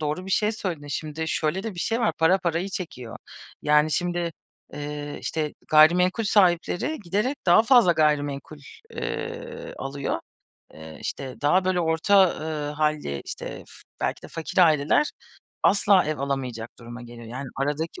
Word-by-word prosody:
doğru 155 +5 -3
bir - - -6
şey 210 +3 +2
söyledin. 175 -9 -4
Şimdi 155 +2 -4
şöyle 160 +5 -1
de 220 -4 -5
bir - - -11
şey 230 +6 0
var, 230 - +2
para 165 +4 +4
parayı 175 +1 -1
çekiyor. 165 - -6 0.5
Yani, 150 +1 +4
şimdi, 175 0 -1 0.4
eee, 145 0 -5
işte, 155 -2 -3
gayrimenkul 180 +7 +5
sahipleri 185 - +2
giderek 210 +11 0
daha 175 +5 +7
fazla 235 -7 +6
gayrimenkul, 150 -2 0 0.3
eee, 485 +1 -5
alıyor. 140 0 -3 0.5
Eee, 80 0 -11
işte, 130 -2 -5
daha 180 +6 +3
böyle 185 -1 +1
orta, 175 +4 +4
ııı, 155 -2 -3
hâlli, 150 - -1
işte, - - -6 0.2
f - - -17 0.3
belki - - -2
de - - -10
fakir 165 +3 -5
aileler 160 - +4 0.5
asla 200 -2 +4
ev 155 -1 -2
alamayacak 130 -5 -3
duruma 120 +1 -9
geliyor. 120 -1 -11
Yani, 130 +4 -6
aradaki 150 - -2
160 Hz, 150 wpm, -25 LUFS, 145-185 Hz, 0.5 s, daha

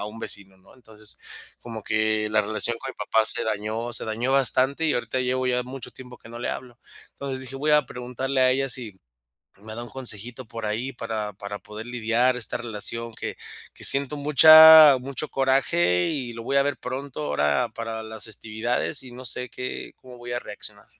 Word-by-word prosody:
a 105 - -4
un 110 +2 -9
vecino, 95 -2 -7
¿no?, 95 - -19
entonces, 110 -4 -10 0.4
como 115 -3 -7
que 110 -1 0
la 110 0 +3
relación 110 +3 -1
con 135 - -6
mi - - -14
papá 110 0 +1
se - - +2
dañó, 110 +2 -3
se - - +1
dañó 120 +4 -2
bastante 135 +3 +3
y 155 - +1
ahorita 130 +1 -2
llevo 130 0 -1
ya 125 0 +1
mucho 130 +1 -8
tiempo 125 -1 -12
que - - -15
no 120 - -9
le - - -3
hablo, 125 -1 -8 0.3
entonces 135 -1 -5
dije: 130 +1 -6
"Voy 150 +3 -1
a 150 -3 +4
preguntarle 125 +2 -3
a 130 - +5
ella 135 +1 -1
si 115 -4 -2 0.7
me 110 +1 -9
da 120 - -5
un 120 - -10
consejito 120 0 -4
por 115 0 -7
ahí", 120 +6 -3
para 110 -3 -5
para 100 +1 -7
poder 105 +2 -9
lidiar 120 +1 +1
esta 125 - -4
relación 115 0 -4
que - - -6 0.4
que - - -5
siento 140 +1 +5
mucha 155 0 +9
mucho 140 +4 -5
coraje 90 -10 +1
y 130 -7 -4
lo 115 0 -8
voy 140 +4 0
a - - +5
ver 145 - -2
pronto 130 - -6
ahora 75 0 0
para 115 -1 -5
las 110 -2 -9
festividades 110 +2 -2
y 130 - -11
no 125 +1 -10
sé 125 +1 0
qué 125 0 -6
cómo 125 -1 -14
voy 120 0 -6
a - - -1
reaccionar. 105 - -8
120 Hz, 205 wpm, -24 LUFS, 110-130 Hz, 0.7 s, mucha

